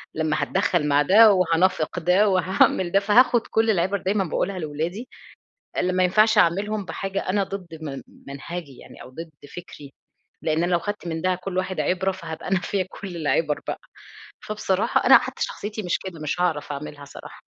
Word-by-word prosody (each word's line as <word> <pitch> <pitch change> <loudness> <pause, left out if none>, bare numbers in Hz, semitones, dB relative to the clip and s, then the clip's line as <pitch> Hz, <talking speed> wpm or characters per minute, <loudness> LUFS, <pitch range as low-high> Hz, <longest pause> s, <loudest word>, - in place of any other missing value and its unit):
لمّا 155 -1 0
هاتدخَّل 180 -5 0
مع 145 0 +3
ده 210 +8 +7
وهانافق 180 -1 +1
ده 180 +5 +3
وهاعمل 185 -1 +2
ده، 195 - +4
فهاخُد 230 +4 +3
كل 225 0 +1
العِبَر 190 0 +1
دايمًا 195 +1 0
باقولها 185 +2 -2
لولادي، 165 +9 -4 0.7
اللي 185 - 0
ما 185 0 +2
ينفعش 215 +4 +4
أعملهم 205 +3 +2
بحاجة 195 +1 -4
أنا 195 +1 +1
ضد 185 -4 -8
م 140 -3 -6 0.2
منهجي 140 0 -8
يعني - - -13
أو - - -12
ضد 165 +5 -9 0.3
فِكري، 150 -5 -10 0.5
لإن 160 +1 0
أنا 180 - -1
لو 175 - +4
خدت 205 +1 -5
من 160 -1 -4
ده 185 0 +2
كل 185 +1 -5
واحد 185 0 -2
عِبرة، 190 +1 0
فهابقى 165 -4 -8
أنا 190 -1 +1
فيّا 190 0 -2
كل 190 -3 -8
العِبَر 155 -1 0
بقى. - - -3 0.6
فبصراحة 210 -2 0
أنا - - +9
حتّى - - -4
شخصيتي 215 - -5
مش 180 - 0
كده، 185 -4 -8
مش 155 +3 -3
هاعرف 160 -5 -1
أعملها 145 0 -7
صراحة. 140 - -12
185 Hz, 180 wpm, -23 LUFS, 160-195 Hz, 0.7 s, أنا